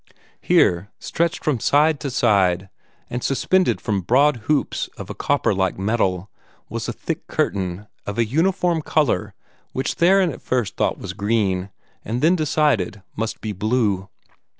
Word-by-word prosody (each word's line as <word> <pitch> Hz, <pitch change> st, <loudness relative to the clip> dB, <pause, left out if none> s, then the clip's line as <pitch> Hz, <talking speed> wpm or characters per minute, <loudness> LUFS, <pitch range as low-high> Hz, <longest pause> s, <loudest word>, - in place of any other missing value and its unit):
Here, 90 Hz, +3 st, +3 dB
stretched 170 Hz, 0 st, -1 dB
from 145 Hz, -6 st, +1 dB
side 150 Hz, +5 st, +3 dB
to 140 Hz, -, -3 dB
side, 95 Hz, -7 st, +2 dB, 0.4 s
and 125 Hz, 0 st, -4 dB
suspended 185 Hz, +7 st, +2 dB
from 100 Hz, -4 st, -1 dB
broad 135 Hz, +8 st, +3 dB
hoops 150 Hz, -2 st, 0 dB
of -, -, -7 dB
a -, -, -4 dB
copper -, -, +1 dB
like 95 Hz, -1 st, 0 dB
metal, 95 Hz, -2 st, 0 dB, 0.4 s
was -, -, -4 dB
a -, -, 0 dB
thick -, -, -5 dB
curtain, 95 Hz, 0 st, -2 dB, 0.2 s
of 105 Hz, -, -4 dB
a 115 Hz, -, +3 dB
uniform 170 Hz, -, +1 dB
color 125 Hz, -10 st, 0 dB, 0.4 s
which 130 Hz, -, -1 dB
Theron 185 Hz, 0 st, +4 dB
at 125 Hz, -, -10 dB
first 120 Hz, -7 st, -1 dB
thought -, -, 0 dB
was -, -, -6 dB
green, 100 Hz, -3 st, 0 dB, 0.3 s
and 120 Hz, +5 st, -3 dB
then 170 Hz, +3 st, +5 dB
decided 145 Hz, -, +1 dB
must 115 Hz, +1 st, -3 dB
be 110 Hz, -, -3 dB
blue. 105 Hz, -2 st, 0 dB
115 Hz, 150 wpm, -22 LUFS, 100-150 Hz, 0.4 s, then